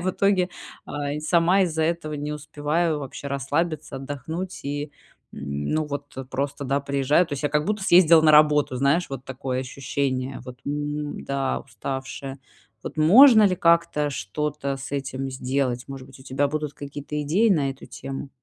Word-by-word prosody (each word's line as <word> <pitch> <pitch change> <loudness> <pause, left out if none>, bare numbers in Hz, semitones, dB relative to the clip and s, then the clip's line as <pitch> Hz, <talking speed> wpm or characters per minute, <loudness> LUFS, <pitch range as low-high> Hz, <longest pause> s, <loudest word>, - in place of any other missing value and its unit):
и - - -6
в 185 - +1
итоге, 190 -1 +2 0.4
э, 145 0 -3
и - - -4
сама 175 +4 +3
из-за 160 -3 0
этого 160 -2 -1
не 150 +1 -4
успеваю 150 +2 -1
вообще 140 +1 -7
расслабиться, 145 +2 -2
отдохнуть 145 +7 -5
и 145 +1 -4 0.4
ну 70 - -2
вот 145 -1 -6 0.2
просто, 140 +1 -3
да, 140 +2 0
приезжаю 140 +4 +2
То 150 - -10
есть, 135 - -6
я 145 - +3
как 150 0 +1
будто 210 -1 -1
съездила 170 -2 +7
на 155 - +6
работу. 150 -3 +5
Знаешь, 140 +7 +2
вот 135 -1 -6
такое 130 -1 -3
ощущение: 130 0 -3
"Вот, 125 0 -10
м, 145 0 -3
да, 135 -1 -1
уставшая". 135 +3 -6 0.4
Вот - - -7
можно 220 - +8
ли 185 -3 +3
как-то, 170 -4 +2
что-то 140 +6 -3
с 135 +1 -8
этим 135 -1 -3
сделать? 130 -1 -1
Может 135 -1 -8
быть, 135 0 -15
у - - -12
тебя 140 +2 0
будут 150 -1 -3
какие-то 145 +1 -6
идеи 185 +11 +3
на 145 -7 +2
эту 135 - -10
тему? 135 +1 -7
145 Hz, 175 wpm, -24 LUFS, 135-155 Hz, 0.4 s, можно